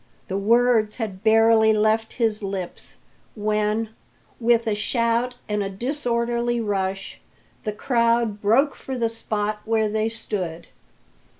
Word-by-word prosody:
The 190 - -1
words 225 0 +3
had 205 -5 -5
barely 220 0 +5
left 220 +1 +1
his 225 -3 0
lips 195 -3 -6 0.4
when, 215 +1 0 0.5
with 235 0 +3
a 220 - +1
shout 230 +3 0
and 210 -1 -1
a 195 - -2
disorderly 240 +1 -1
rush, 195 -3 -3 0.4
the 215 - 0
crowd 230 -2 +1
broke 260 +8 +3
for 265 -1 -6
the 230 -2 +1
spot 215 -2 -3
where 220 -1 +1
they 220 +1 0
stood. 185 -7 -5
220 Hz, 125 wpm, -23 LUFS, 210-235 Hz, 0.5 s, barely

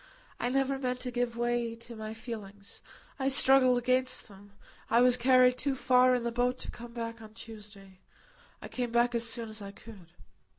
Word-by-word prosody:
I 245 - -1
never 270 +1 0
meant 250 -1 -2
to 250 - -3
give 245 -1 -2
way 240 -1 -1
to 235 +1 -12
my 220 0 -7
feelings. 205 -4 -9 0.4
I 270 0 +1
struggled 265 -2 +5
against 255 +1 0
them. 200 0 -16 0.4
I 230 - +4
was 250 0 +5
carried 250 0 +4
too 280 -2 +1
far 255 0 +4
in 245 - -2
the 235 - -1
boat 245 +1 0
to - - -5
come 240 0 -10
back 230 -1 -5
on 215 0 -13
Tuesday. 205 -4 -11 0.6
I - - -6
came 245 -2 -4
back 240 +1 +2
as 235 0 0
soon 230 0 -4
as 215 0 -7
I 200 - -7
could." 200 -3 -13
240 Hz, 195 wpm, -30 LUFS, 220-250 Hz, 0.6 s, struggled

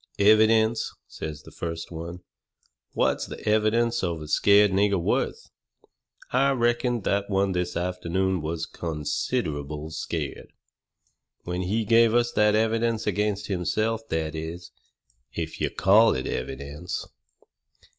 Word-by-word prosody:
"Evidence!" 110 +2 +4
says 75 -2 -7
the - - -13
first 85 0 -5
one. 85 +2 -7 0.7
"What's - - +1
the - - -8
evidence 110 +2 +2
of 85 -3 -1
a 75 - -8
scared 100 +6 +5
nigger 100 0 +2
worth?" 85 - -1 0.8
"I 135 +2 +3
reckon 120 -1 +1
that 100 +1 0
one 100 0 +1
this 90 -1 -2
afternoon 90 +1 -1
was 80 +1 -3
considerable 75 -1 -3
scared, 80 - -5 0.9
when 90 +1 -3
he 105 +5 -1
give 115 +1 +5
us 120 0 +2
that 105 0 +3
evidence 115 +1 +1
against 105 0 0
himself 110 +4 -1
that 80 -1 -1
is, 80 +2 -6 0.6
if 80 -1 -4
you - - +1
call 105 - +5
it 65 - -3
evidence." 70 +6 -5
95 Hz, 125 wpm, -26 LUFS, 85-110 Hz, 0.9 s, scared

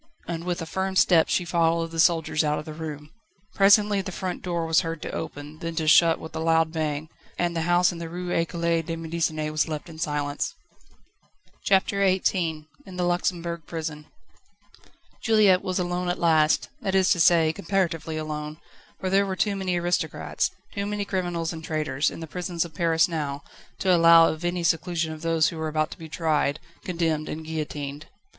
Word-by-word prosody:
And 170 0 -4
with 175 -2 -2
a - - -5
firm 190 +3 -3
step 175 -3 +5
she 180 - +1
followed 165 -1 +1
the 165 - -5
soldiers 160 -1 +3
out 150 0 +1
of 150 - -6
the 155 - -7
room. 150 -1 -7 0.4
Presently 205 0 +5
the 190 0 -6
front 185 0 -4
door 170 -2 -2
was 160 0 +3
heard 165 -1 -4
to - - -5
open, 145 +2 -7
then 165 -1 -5
to 160 -1 -1
shut 165 +1 +6
with 160 0 -9
a - - -2
loud 160 0 +2
bang, 155 -1 -2 0.3
and 175 -1 -1
the 165 - 0
house 175 0 +4
in 170 - -8
the 165 -1 -6
Rue 175 +1 -5
Ecole 170 0 0
de 165 +1 -5
Médecine 160 -2 -2
was 155 +1 +1
left 155 +1 -5
in 160 -1 -11
silence. 145 -2 -2 1.1
CHAPTER 195 0 +2
XVIII 180 -4 +1 0.2
In 190 - -11
the 180 - 0
Luxembourg 175 -2 -1
prison. 155 -2 -5 1.1
Juliette 210 -5 +4
was 185 -1 -2
alone 180 0 -1
at 175 - -1
last 160 -2 +3
that 195 -4 -1
is 190 -1 +4
to 175 - +3
say, 165 -2 +5
comparatively 165 -3 -1
alone, 155 0 -5 0.4
for 185 - -2
there 200 +1 +3
were 190 - -2
too 200 +2 0
many 190 -2 -1
aristocrats, 175 +1 -1 0.2
too 200 0 -3
many 205 -1 -2
criminals 175 -4 -2
and 160 0 -8
traitors, 155 -3 0
in - - -9
the - - -4
prisons 175 +1 -3
of 165 - -11
Paris 165 0 +2
now, 145 -4 -4 0.3
to 185 -2 +3
allow 165 -1 +7
of 155 +2 -5
any 175 0 -1
seclusion 165 0 0
of 155 - -10
those 165 -1 +2
who 165 - -8
were 160 0 -2
about 155 0 -1
to - - -10
be 160 -1 -9
tried, 155 -3 0 0.2
condemned, 165 -4 -1
and 160 +1 -6
guillotined. 150 -1 -5
165 Hz, 190 wpm, -25 LUFS, 155-180 Hz, 1.1 s, allow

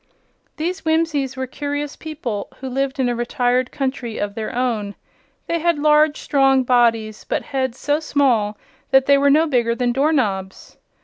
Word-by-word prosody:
These 350 +4 -3
Whimsies 315 -5 0
were 260 - -2
curious 290 +2 -4
people 265 -10 -5
who 265 - -7
lived 270 +1 -2
in 260 - +2
a 240 - 0
retired 245 +1 0
country 260 -5 -3
of 205 0 -3
their 220 0 -4
own. 225 -5 -1 0.5
They 335 - -1
had 340 0 +1
large, 300 0 +3
strong 270 -2 +3
bodies, 230 -3 +1
but - - -2
heads 260 -3 -2
so 290 +2 0
small 250 -9 +1 0.3
that 265 0 +4
they 280 0 +5
were 280 0 +4
no 310 +3 +4
bigger 240 -6 +1
than 245 0 0
door 275 +5 +2
knobs. 195 -10 -2
265 Hz, 170 wpm, -20 LUFS, 240-290 Hz, 0.5 s, they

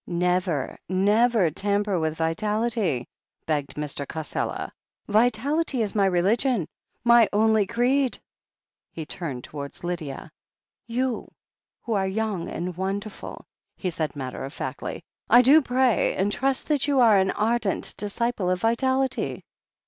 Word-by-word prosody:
"Never, 180 -4 0
never 205 0 +3
tamper 200 +1 0
with 160 -1 -1
vitality," 210 - -1 0.4
begged 145 -3 -2
Mr. 145 -2 -4
Cassela. 160 -1 -4 0.4
"Vitality 245 +5 +2
is 205 - -3
my 200 -2 +3
religion 195 - +1 0.2
— - - -48
^my 235 -2 +7
only 215 -1 +3
creed." 250 +4 +1 0.7
He 160 - -6
turned 145 -6 -5
towards 140 +1 -8
Lydia. 160 -4 -5 0.6
"You, 245 +1 -2 0.5
who 230 - -2
are 195 -2 +1
young 205 -3 -2
and 175 +1 -4
wonderful," 195 +3 -5 0.3
he 185 - -2
said 155 -2 -3
mat 130 -3 -5
ter - - -6
of 135 +2 -6
factly, - - -5 0.3
"I 245 +1 +8
do 290 +5 +7
pray 255 -4 +2
and 195 +2 +1
trust 270 +4 -1
that 295 -2 +1
you 280 -2 +2
are 220 -5 +6
an 190 0 +2
ardent 220 -1 0
disciple 205 -1 -1
of 185 0 +1
vitality 260 +4 0
205 Hz, 135 wpm, -25 LUFS, 175-235 Hz, 0.7 s, I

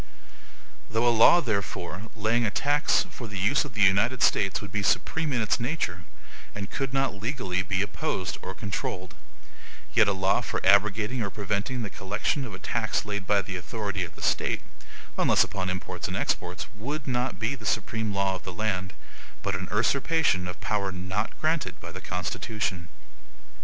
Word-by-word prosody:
Though 115 +2 +2
a 120 - +5
law, 115 +10 +7
therefore, 100 - -3
laying 115 +2 +2
a 110 - +2
tax 145 +7 +2
for 120 - -7
the 100 -2 -6
use 110 +11 +3
of 130 -5 -9
the 105 - +4
United 115 +7 +4
States 100 -2 +3
would 100 -2 -8
be 105 - -1
supreme 155 +9 +1
in 120 -4 +1
its 110 - +1
nature, 115 - -2 0.5
and 100 0 -5
could 135 -2 -2
not 135 -2 +1
legally 100 -3 -2
be 95 +1 0
opposed 100 - -2
or 95 - -6
controlled, 95 -3 -4 0.8
yet 115 -3 +6
a 100 - +3
law 95 +1 +2
for - - -2
abrogating 105 +5 +4
or 100 - -1
preventing 105 +5 -2
the 100 - -5
collection 105 +8 -1
of 110 - -7
a - - -7
tax 110 +2 -1
laid 100 -2 -3
by 100 -1 +3
the 90 +1 -4
authority 100 +1 -3
of 85 -1 -7
the - - -9
State, - - +1 0.6
(unless - - +5
upon 95 -2 -3
imports 95 0 -3
and - - -3
exports), 90 +1 -1
would 140 +8 -4
not 125 0 -1
be 110 +4 0
the 125 -5 -9
supreme 110 +1 0
law 100 -1 +1
of 90 -3 -6
the 95 - -5
land, 95 -2 -2 0.5
but 100 - -1
a 95 -1 -3
usurpation 130 - +2
of 90 - -6
power 100 -2 0
not 95 +4 -3
granted 155 -1 0
by - - -8
the - - -8
Constitution. 90 0 -3
105 Hz, 180 wpm, -27 LUFS, 95-120 Hz, 0.8 s, law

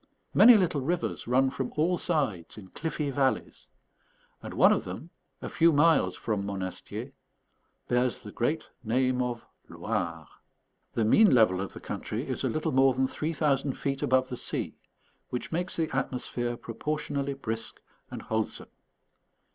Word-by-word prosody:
Many 235 -1 +9
little 170 -7 +1
rivers 170 0 -2
run 130 +2 +3
from 130 -2 -3
all 165 +4 +2
sides 135 - -2
in 95 -3 -11
cliffy 150 - -3
valleys; 135 0 -1 0.7
and - - -7
one - - +6
of - - -1
them, 95 - -8 0.3
a - - -3
few 165 0 +4
miles 160 +2 +4
from 105 -3 -2
Monastier, 95 -2 -5 0.8
bears 125 0 0
the 105 - -8
great 150 +9 -1 0.2
name 125 +2 +1
of 120 -2 -3 0.2
Loire. 85 -3 -3 0.7
The 115 - +1
mean 200 - +6
level 95 -6 +4
of 100 - -5
the - - -8
country - - -5
is - - -3
a - - +1
little 155 0 -1
more 130 0 +4
than 130 0 +2
three 155 +4 -3
thousand 140 -3 +1
feet 135 -1 -3
above 130 0 +2
the 125 - -5
sea, - - -3 0.6
which 125 - -4
makes 175 +3 -1
the 160 -5 -1
atmosphere 125 -2 -2
proportionally 140 +3 -3
brisk 115 -4 -5 0.3
and - - -7
wholesome. 110 -1 -3
130 Hz, 155 wpm, -28 LUFS, 115-150 Hz, 0.8 s, Many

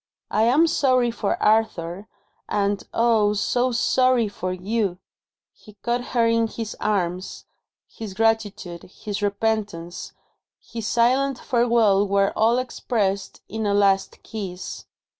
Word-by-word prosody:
"I 220 - +3
am 275 +8 +5
sorry 255 -6 +2
for 215 -3 -2
Arthur 210 -3 +1 0.4
and, 200 0 0
oh, 225 -3 +3
so 245 +4 +1
sorry 250 0 +3
for 185 -2 -4
You!" 195 0 -1 0.6
He 210 - -17
caught 240 +1 0
her 230 - +5
in 230 0 +2
his 225 -1 -6
arms. 185 -3 -2 0.4
His 210 -4 -8
gratitude, 215 -6 0
his 205 +2 -7
repentance, 205 -4 -2 0.5
his 225 -2 -6
silent 255 +4 +2
farewell 230 -6 +2
were 200 0 +2
all 230 +2 +3
expressed 205 -6 -2
in 220 -1 -3
a 200 - +2
last 195 -1 +2
kiss. 190 -5 -6
215 Hz, 120 wpm, -23 LUFS, 200-235 Hz, 0.6 s, am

